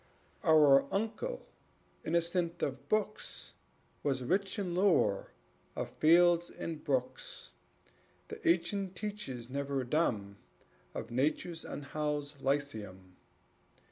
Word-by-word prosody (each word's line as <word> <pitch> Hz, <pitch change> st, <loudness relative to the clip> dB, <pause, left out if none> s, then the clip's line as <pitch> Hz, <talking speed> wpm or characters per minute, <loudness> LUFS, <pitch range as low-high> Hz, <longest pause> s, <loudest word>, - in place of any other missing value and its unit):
Our 145 Hz, -3 st, +6 dB
uncle, 225 Hz, -, -2 dB, 0.6 s
innocent 170 Hz, +1 st, 0 dB
of -, -, -3 dB
books, 215 Hz, 0 st, -2 dB, 0.5 s
Was 135 Hz, -3 st, 0 dB
rich 195 Hz, -, 0 dB
in 185 Hz, -4 st, -2 dB
lore 175 Hz, -, +3 dB, 0.5 s
of -, -, -3 dB
fields 175 Hz, +2 st, +5 dB
and 160 Hz, -2 st, -6 dB
brooks, 130 Hz, -3 st, -2 dB, 0.8 s
The -, -, -6 dB
ancient 185 Hz, +3 st, +1 dB
teachers 200 Hz, -, -5 dB
never 140 Hz, 0 st, -2 dB
dumb 110 Hz, -8 st, 0 dB, 0.6 s
Of -, -, -5 dB
Nature's 155 Hz, +6 st, 0 dB
unhoused 145 Hz, 0 st, -3 dB
lyceum. 105 Hz, -10 st, -2 dB
155 Hz, 95 wpm, -33 LUFS, 135-175 Hz, 0.8 s, Our